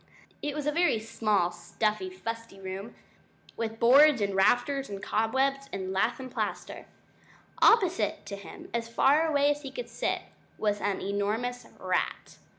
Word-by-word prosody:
It 295 Hz, 0 st, -3 dB
was 300 Hz, -2 st, -3 dB
a 300 Hz, -, +2 dB
very 335 Hz, -6 st, +2 dB
small 215 Hz, -5 st, 0 dB
stuffy 215 Hz, -, -2 dB
fusty 230 Hz, -, -7 dB
room, 195 Hz, +4 st, -7 dB, 0.6 s
with 225 Hz, -1 st, -4 dB
boards, 275 Hz, +3 st, +7 dB
and 200 Hz, -1 st, 0 dB
rafters, 245 Hz, +8 st, +2 dB
and 200 Hz, -1 st, -5 dB
cobwebs, 265 Hz, +7 st, 0 dB
and 190 Hz, -1 st, -4 dB
lath 220 Hz, +7 st, +1 dB
and 260 Hz, -1 st, -7 dB
plaster. -, -, -4 dB, 0.7 s
Opposite 375 Hz, -6 st, +3 dB
to 200 Hz, -, -5 dB
him 200 Hz, -, -11 dB
as 235 Hz, -1 st, -1 dB
far 285 Hz, +7 st, +4 dB
away 290 Hz, -2 st, +3 dB
as 290 Hz, 0 st, -3 dB
he 275 Hz, -, -6 dB
could -, -, -7 dB
sit -, -, -2 dB, 0.3 s
was 210 Hz, -1 st, 0 dB
an 200 Hz, -1 st, -1 dB
enormous 215 Hz, +5 st, -2 dB
rat. -, -, -2 dB
230 Hz, 155 wpm, -28 LUFS, 205-280 Hz, 0.7 s, boards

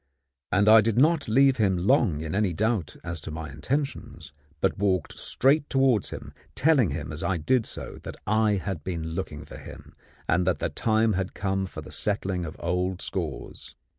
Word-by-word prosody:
And 100 Hz, +2 st, +3 dB
I 110 Hz, +1 st, +9 dB
did 115 Hz, 0 st, 0 dB
not 150 Hz, +2 st, +3 dB
leave 135 Hz, +4 st, +4 dB
him 100 Hz, -5 st, +2 dB
long 95 Hz, -, +2 dB
in 80 Hz, -1 st, -4 dB
any 100 Hz, -2 st, +1 dB
doubt 105 Hz, -3 st, -1 dB
as 85 Hz, -2 st, -5 dB
to -, -, -7 dB
my 80 Hz, -1 st, -6 dB
intentions, 85 Hz, -, -4 dB, 0.3 s
but -, -, 0 dB
walked 95 Hz, -4 st, 0 dB
straight 145 Hz, +3 st, +1 dB
towards 135 Hz, -6 st, +2 dB
him, -, -, -8 dB, 0.2 s
telling 140 Hz, -, +4 dB
him 70 Hz, 0 st, -4 dB
as 75 Hz, +3 st, -4 dB
I 90 Hz, 0 st, 0 dB
did 115 Hz, +9 st, +1 dB
so -, -, -7 dB
that -, -, -8 dB
I 110 Hz, 0 st, +2 dB
had 95 Hz, -5 st, -4 dB
been 85 Hz, -2 st, -4 dB
looking 80 Hz, -3 st, -5 dB
for -, -, -10 dB
him, -, -, -12 dB, 0.3 s
and 90 Hz, +1 st, +2 dB
that 90 Hz, -, +2 dB
the -, -, -2 dB
time 110 Hz, 0 st, +1 dB
had 95 Hz, 0 st, -3 dB
come 95 Hz, -1 st, -1 dB
for -, -, -8 dB
the -, -, -11 dB
settling 95 Hz, -4 st, -1 dB
of 80 Hz, -, -7 dB
old 90 Hz, +1 st, -1 dB
scores. -, -, -5 dB
95 Hz, 190 wpm, -26 LUFS, 85-115 Hz, 0.3 s, I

